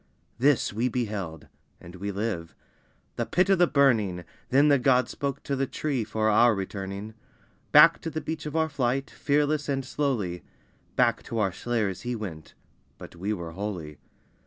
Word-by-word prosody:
This 135 -4 +3
we 120 +4 0
beheld 105 -10 -4 0.3
(and 85 - -12
we 100 +2 -4
live) 100 -5 -3 0.6
the - - 0
Pit 185 +2 +2
of 190 - +4
the 175 - +6
Burning, 110 - +2 0.3
Then 140 +3 +5
the 140 -2 +5
God 125 -1 +3
spoke 140 -1 -4
to 140 - -2
the 135 0 -1
tree 140 -5 -2
for 110 0 -1
our 110 +2 +5
returning; 100 +2 -5 0.6
Back 165 +3 +7
to 165 - -4
the 155 - -3
beach 160 -1 -5
of 150 - -6
our 160 0 +2
flight, 135 -2 -1
fearless 150 +1 0
and 135 -1 -1
slowly, 120 -9 -2 0.5
Back 120 -2 +2
to 115 - -5
our 100 -3 +1
slayers 105 -2 -2
he 120 0 -3
went: 90 -9 -7 0.4
but - - -11
we 95 +5 -3
were 85 -5 -4
holy. 85 -5 -5
120 Hz, 170 wpm, -27 LUFS, 100-140 Hz, 0.6 s, Back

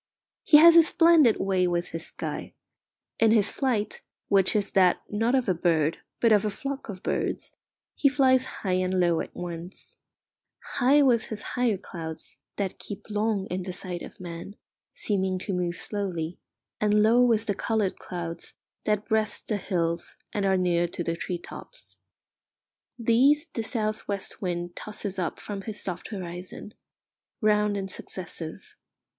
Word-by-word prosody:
He 300 - +8
has 335 +2 +9
a 335 - +10
splendid 325 -7 +5
way 190 -2 +2
with 175 0 -1
his 165 0 -4
sky. - - -5 0.6
In 225 - +5
his 215 -2 +4
flight, 230 -6 -1 0.3
which 195 +1 +4
is 205 -1 0
that, 185 -3 +4
not 225 +5 +1
of 255 -3 +1
a 185 - +3
bird, 165 -2 +1 0.2
but 230 - +4
of 210 -2 +5
a 215 - 0
flock 275 +5 -5
of 185 -2 -7
birds, - - -1 0.4
he 280 - +3
flies 260 -2 +3
high 185 -7 -1
and 185 0 0
low 170 -2 +3
at - - -8
once: 175 +1 -6 0.8
high 280 +3 +5
with 240 -4 +4
his 215 -2 -6
higher 245 -5 +1
clouds, 160 -4 -7 0.2
that 195 -2 -3
keep 205 +1 -7
long 210 -2 0
in 185 +1 -1
the 185 0 -5
sight 180 -2 -5
of - - -10
man, 175 +2 -7 0.4
seeming 190 -3 0
to 190 +2 -4
move 175 -1 -1
slowly; 180 -5 -4 0.4
and 210 0 +3
low 235 +3 +5
with 230 -2 +3
the 205 - 0
coloured 210 -1 -1
clouds 170 -1 -5 0.3
that 210 -1 +1
breast 220 -1 0
the 215 - +1
hills 170 -3 -1 0.2
and 200 -1 0
are 190 0 +3
near 175 -1 +2
to 175 - -5
the 165 0 -1
tree 175 +1 -3
tops. - - -11 1.0
These 255 +6 +4
the 230 - -1
south 215 -1 -2
west 200 -2 -3
wind 175 -2 -3
tosses 205 -2 -3
up 175 - -2
from 200 -2 -6
his 210 +1 -3
soft 180 -2 -3
horizon, 180 +1 -6 0.7
round 210 -1 +2
and 195 -1 -3
successive. 170 -4 -2
200 Hz, 160 wpm, -27 LUFS, 180-220 Hz, 1.0 s, a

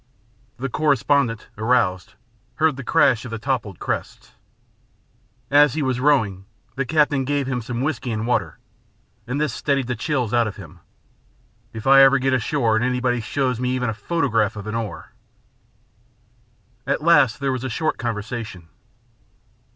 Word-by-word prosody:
The 130 +3 -3
correspondent, 140 -4 +1
aroused, 110 -6 0 0.4
heard 155 0 +2
the 140 - -7
crash 125 -1 +3
of 125 - -7
the 115 - -4
toppled 110 -6 -3
crests. - - -5 1.2
As 145 -1 +5
he 155 - -1
was 130 -2 -1
rowing, 115 -9 +1 0.3
the 135 -1 -2
captain 145 -2 +2
gave 140 +1 -1
him 125 -2 -2
some 120 +2 -4
whisky 130 -4 -2
and 110 0 -2
water, 110 -9 -1 0.7
and 130 +4 -2
this 150 -5 0
steadied 140 -3 0
the 125 0 -3
chills 125 -1 -2
out 120 -1 +3
of 105 - -6
him. 85 -3 -12 0.9
"If 110 -1 -8
I 135 0 +7
ever 135 0 +6
get 135 0 0
ashore 125 -2 +1
and 110 - +1
anybody 125 -1 0
shows 125 +1 -1
me 125 0 -1
even 125 -2 -1
a - - -4
photograph 115 - 0
of 105 -1 -7
an 110 - -5
oar 115 -2 -5 0.8
" 115 +1 -38
At 140 - -1
last 145 -8 +4
there 135 -1 0
was 130 -1 -3
a 130 - -3
short 155 +6 -2
conversation. 110 -6 -5
125 Hz, 160 wpm, -22 LUFS, 115-135 Hz, 1.2 s, I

